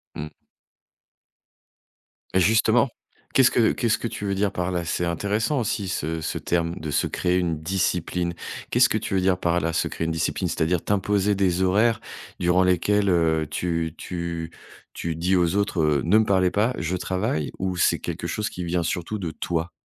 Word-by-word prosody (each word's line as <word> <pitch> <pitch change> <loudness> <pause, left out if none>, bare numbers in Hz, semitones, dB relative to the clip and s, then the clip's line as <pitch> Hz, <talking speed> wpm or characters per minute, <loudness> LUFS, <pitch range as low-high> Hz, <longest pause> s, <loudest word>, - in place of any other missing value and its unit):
Mmh. 75 +1 -5 2.0
Et 95 - +4
justement! 110 +6 +4 0.4
Qu'est-ce 130 -2 +5
que 115 -2 +3
qu'est-ce 115 -3 +1
que - - -3
tu 105 - -7
veux 100 - 0
dire 100 0 +1
par 90 +1 -2
là? 90 -1 -2
C'est 90 - -1
intéressant 105 - 0
aussi 105 -4 -2
ce 80 -2 -2
ce - - -3
terme 85 -1 -1
de 80 - -5
se 70 - +1
créer 90 0 0
une 85 -4 -1
discipline. 90 0 -1 0.4
Qu'est-ce - - +5
que - - 0
tu - - -4
veux 95 - +3
dire 90 -1 +2
par 85 -1 +1
là, 85 -1 -1
se - - 0
créer 80 - -3
une 80 - -1
discipline? 80 +3 -1
C'est-à-dire 85 +1 0
t'imposer 100 0 +1
des 95 -2 +1
horaires 110 +4 +3 0.4
durant 90 +1 +3
lesquels, 100 +3 +2
heu, 80 -3 +2
tu 85 -2 -1
tu 85 -2 -5 0.4
tu 85 -1 -3
dis 90 +4 +1
aux 90 0 +2
autres: 100 -4 0
«Heu, 75 -2 +2
ne 95 +6 +5
me 110 - +5
parlez 95 -3 +3
pas, 110 +5 +1
je 85 +2 -2
travaille»? 90 -4 -2
Ou 95 -1 -1
c'est 85 - +2
quelque - - -4
chose 105 0 -2
qui 90 - -6
vient 85 0 0
surtout 85 +5 -2
de 85 -4 -3
toi? 85 +1 -2
90 Hz, 190 wpm, -24 LUFS, 85-100 Hz, 2.0 s, Qu'est-ce